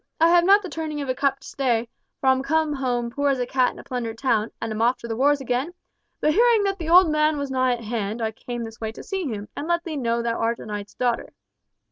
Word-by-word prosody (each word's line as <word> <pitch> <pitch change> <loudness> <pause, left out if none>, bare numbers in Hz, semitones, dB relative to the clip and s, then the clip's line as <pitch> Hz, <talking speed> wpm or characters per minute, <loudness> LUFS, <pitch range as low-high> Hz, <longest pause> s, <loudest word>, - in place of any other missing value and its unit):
I 330 +1 +5
have 345 0 +5
not 400 +2 +6
the - - -4
turning 315 -3 -4
of 275 - -5
a - - +2
cup 275 +1 0
to - - -12
stay, 240 -4 0 0.3
for - - -6
I'm 260 0 +4
come 315 +2 +1
home 245 -3 -1
poor 285 +3 0
as 275 - +2
a 250 - -1
cat 255 0 +2
in - - -16
a - - -10
plundered 235 -3 -4
town, 225 -4 +1
and 225 - -4
am 215 +1 -3
off 245 +2 +3
to 235 - -6
the 225 - -3
wars 285 +4 +3
again; 270 +6 -2 0.4
but 305 - +2
hearing 460 +1 +4
that 395 -1 -1
the 325 -1 -4
old 350 -1 +7
man 305 0 +2
was 280 -1 -3
nigh 255 -1 +2
at 235 -1 -5
hand, 220 0 -3
I 220 -1 -1
came 240 +2 -6
this 225 0 -9
way 220 -1 -2
to - - -10
see 385 -5 -3
him, 210 -4 -5
and 300 - -5
let 340 0 +1
thee 315 -3 -4
know 235 -2 0
thou 230 -1 -1
art 230 +1 0
a - - -10
knight's 205 -1 -6
daughter. 245 -2 -1
260 Hz, 275 wpm, -24 LUFS, 230-310 Hz, 0.4 s, old